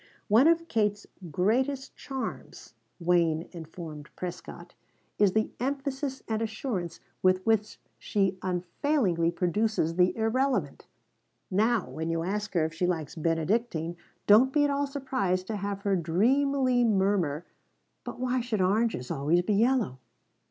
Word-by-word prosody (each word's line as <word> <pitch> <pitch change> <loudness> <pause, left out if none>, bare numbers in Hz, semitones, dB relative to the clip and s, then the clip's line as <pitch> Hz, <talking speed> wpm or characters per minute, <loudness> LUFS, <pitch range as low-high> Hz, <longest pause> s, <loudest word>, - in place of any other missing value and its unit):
"One 230 +8 +6
of 335 0 +3
Kate's 210 -5 0 0.3
greatest 255 - 0
charms," 265 -2 -6 0.3
Wayne 170 -2 +2
informed 160 -3 -9
Prescott, 180 -1 -7 0.5
"is 200 -3 +4
the 220 0 +1
emphasis 270 +1 -3
and 220 -1 -1
assurance 220 - -3 0.2
with 185 0 +3
which 220 -1 +1 0.2
she 195 -2 0
unfailingly 180 - 0
produces 180 0 0
the 180 +3 +3
irrelevant. 255 +4 0 0.6
Now 215 +2 +2
when 160 +1 -4
you 165 0 -1
ask 210 +3 -3
her 165 -2 +3
if 160 - -4
she 175 +2 0
likes 160 -5 -2
Benedictine, 165 +2 -1 0.3
don't 230 +6 +6
be 295 +1 +3
at 290 - +2
all 280 0 0
surprised 255 -10 -1
to 215 +1 -3
have 200 0 -4
her 200 -1 +1
dreamily 250 - +2
murmur: 190 -7 +1 0.6
'But - - -7
why 255 0 0
should 230 -3 -2
oranges 195 - +1
always 155 +6 +2
be 210 - 0
yellow?'" 220 - +2
205 Hz, 135 wpm, -28 LUFS, 175-250 Hz, 0.6 s, One